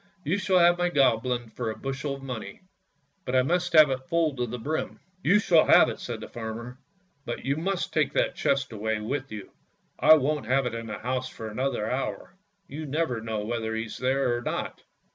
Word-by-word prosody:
" 185 - -35
You 185 +7 +1
shall 190 -1 +2
have 175 0 +5
my 175 0 +2
Goblin 125 -5 +1
for 115 0 -3
a 110 - -4
bushel 135 +1 -3
of 135 - -12
money, 125 +2 -7 0.6
but 130 - -2
I 130 - +5
must 175 +4 0
have 155 -3 +7
it 130 0 -4
full 165 -4 +1
to 125 -2 -2
the 120 +2 -5
brim! 150 +7 -3
" 185 - -39
" 185 - -36
You 190 +7 +5
shall 170 -6 +4
have - - +7
it," - - -6
said - - -6
the - - -7
farmer; 115 +2 -7 0.2
" 180 -6 -42
but 120 - -5
you 140 +1 +1
must 180 +4 -2
take 150 -3 +2
that - - +1
chest 135 -2 0
away 110 0 -2
with 135 +5 -4
you; 105 -3 -8 0.5
I 155 - +8
won't 150 -4 -1
have 135 +2 +2
it 125 - -2
in 115 0 -5
the 105 - -5
house 130 +1 -3
for 110 -3 -7
another 125 -2 -1
hour; 130 +3 -3 0.3
you 155 +2 -6
never 135 -5 -1
know 110 -2 -3
whether 110 -1 -2
he's 110 -1 -5
there 130 -1 +1
or 120 - -3
not." - - -4
130 Hz, 225 wpm, -27 LUFS, 115-155 Hz, 0.6 s, I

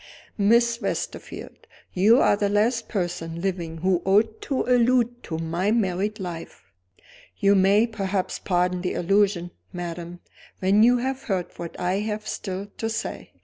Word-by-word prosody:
"Miss 235 +3 +3
Westerfield, - - -5 0.3
you 215 +7 +5
are - - +4
the 205 0 0
last 225 +3 +1
person 175 -4 -3
living 175 -3 -3
who 185 -2 +3
ought 215 +3 +2
to 270 - -1
allude 245 -1 +2
to 160 - -4
my 165 +4 -1
married 210 -1 0
life." 175 -3 -7 0.7
"You 200 0 +4
may 200 +3 +4
perhaps 195 -4 -2
pardon 180 -1 0
the 180 - -2
allusion, 195 -1 +1 0.2
madam, 175 0 -6 0.4
when 195 +3 +3
you 245 +2 +6
have 260 +2 -2
heard 185 -4 -2
what 170 -1 -7
I 180 +2 0
have 215 0 -4
still 190 0 -4
to 225 - -1
say. 225 +1 -5
200 Hz, 145 wpm, -24 LUFS, 180-225 Hz, 0.7 s, you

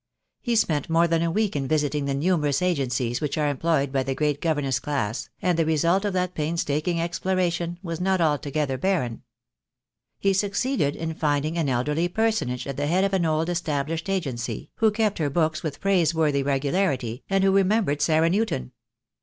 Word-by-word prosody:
He 240 -2 0
spent 155 -10 +1
more 165 +1 +4
than 165 -1 +1
a 170 - +1
week 210 +2 0
in 135 -2 -1
visiting 150 -1 0
the 140 -1 -1
numerous 150 -1 +1
agencies 130 -8 0
which 150 0 -2
are 150 -1 +1
employed 145 -1 0
by 135 -1 +1
the 135 0 -2
great 150 -1 0
governess 145 -6 0
class, 115 -7 -3
and 180 -2 +2
the - - +4
result 170 +5 +2
of 205 - -1
that 180 -1 -1
painstaking 165 +1 -1
exploration 175 0 -1
was 165 -1 -4
not 190 0 +1
altogether 145 -3 0
barren. 130 -10 -1 1.0
He 195 0 +2
succeeded 200 - 0
in 160 0 -4
finding 150 0 0
an 165 -5 0
elderly 150 +7 0
personage 215 - -1
at 140 -1 -5
the 145 0 -1
head 180 +5 +2
of 195 0 0
an 175 -3 +2
old 155 +1 0
established 165 -1 -2
Agency, 135 -12 -3
who 225 - +4
kept 210 -2 0
her 150 -3 +1
books 155 +1 0
with 150 -3 -5
praiseworthy 160 -6 +2
regularity, 135 - -1
and 195 0 +2
who 195 - +4
re 195 +1 +5
membered 190 -7 +1
Sarah 160 +2 +3
Newton. 195 - -1
160 Hz, 180 wpm, -25 LUFS, 145-180 Hz, 1.0 s, re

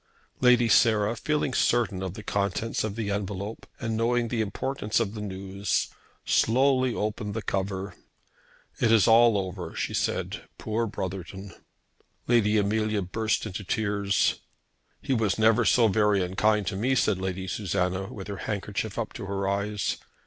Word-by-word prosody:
Lady 125 -2 +5
Sarah, 110 -1 +4
feeling 150 +2 -1
certain 115 -7 +1
of 95 -1 -4
the 110 - -8
contents 100 +2 -1
of 105 -2 -3
the 110 -3 -2
envelope, 100 +1 -4
and 115 -2 -2
knowing 120 +1 +1
the 115 -1 0
importance 110 +1 -1
of 110 -3 -1
the 105 - -6
news, 100 0 -2 0.4
slowly 130 +2 +3
opened 105 0 -3
the 110 - -2
cover. 95 0 -2 0.9
"It 110 - +3
is 110 -3 +5
all 115 -1 +6
over," 90 -3 -5
she - - -2
said, - - -2
"Poor 115 +1 -1
Brotherton!" 95 0 -6 0.7
Lady 110 -3 +3
Amelia 105 0 +1
burst 110 +5 -1
into 105 -1 -5
tears. 100 -1 0 0.6
"He 140 - 0
was 110 -5 +1
never 110 +2 +4
so 115 +1 +5
very 105 -1 +2
unkind 105 +3 +1
to 95 - -2
me," 125 +7 +1
said 105 -6 +2
Lady 95 0 -3
Susanna, 95 -1 -1
with 95 -3 -7
her 100 -1 -5
handkerchief 105 0 -4
up 115 -2 -3
to 100 - -7
her 100 0 -2
eyes. 100 +1 -1
105 Hz, 155 wpm, -27 LUFS, 100-115 Hz, 0.9 s, all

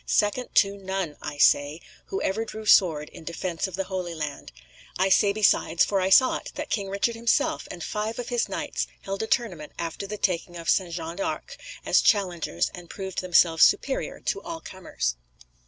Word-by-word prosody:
"SECOND 210 +4 +1
to 200 0 +4
NONE, 190 -5 -3
I 145 0 -6
say, 145 +2 +4 0.3
who 390 - -3
ever 215 +4 0
drew 220 -1 -8
sword 160 -7 +4
in - - -12
defence 170 +2 -3
of 190 - -7
the 195 - -1
Holy 185 -3 -4
Land. 150 -2 -5 0.5
I 190 +1 +2
say, 200 +1 +5
besides, 200 -5 +3
for 195 -2 0
I 185 - +1
saw 255 +6 +6
it, - - -9
that - - -5
King 200 -3 -1
Richard 200 +4 0
himself 230 +1 0
and 170 - -7
five 215 +2 -3
of 245 - -5
his 240 -2 0
knights - - -3
held 195 -1 -4
a 220 - -2
tournament 180 -13 -1
after 170 +4 -4
the 210 +1 -5
taking 175 -2 -1
of 165 0 0
St. 185 -3 +1
John 165 0 -5
de 195 - -1
Acre, - - -4 0.3
as - - +4
challengers, 175 - +1
and 175 -2 -11
proved 190 -2 -5
themselves 170 -3 +4
superior 270 - +2
to 400 - -2
all 335 -1 -6
comers." - - -4
190 Hz, 195 wpm, -26 LUFS, 170-210 Hz, 0.5 s, saw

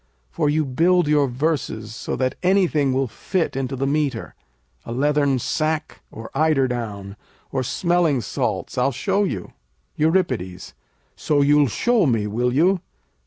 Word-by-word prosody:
For 145 - 0
you 155 +1 +1
build 170 +5 +2
your 150 -2 +3
verses 125 -5 -2
so 115 - -4
that 130 -1 0
anything 180 -7 +2
will 135 +1 +1
fit 165 - -2
into 135 0 -2
the 135 +1 -2
metre, 145 0 -1 0.5
a - - -8
leathern 140 +1 +2
sack, 155 +4 -2
or 115 0 -10
eider 150 -2 +2
down, 105 -5 -5 0.4
or 130 - -1
smelling 170 0 +1
salts. - - -3
I'll 140 - +2
show 195 - 0
you. 95 - -5 0.4
Eur. 165 +5 +3 0.9
So, 145 -2 +1
you'll 145 0 +4
show 225 - +2
me, 115 -5 +1
will 120 +4 0
you? 175 +8 +3
145 Hz, 145 wpm, -22 LUFS, 125-160 Hz, 0.9 s, you'll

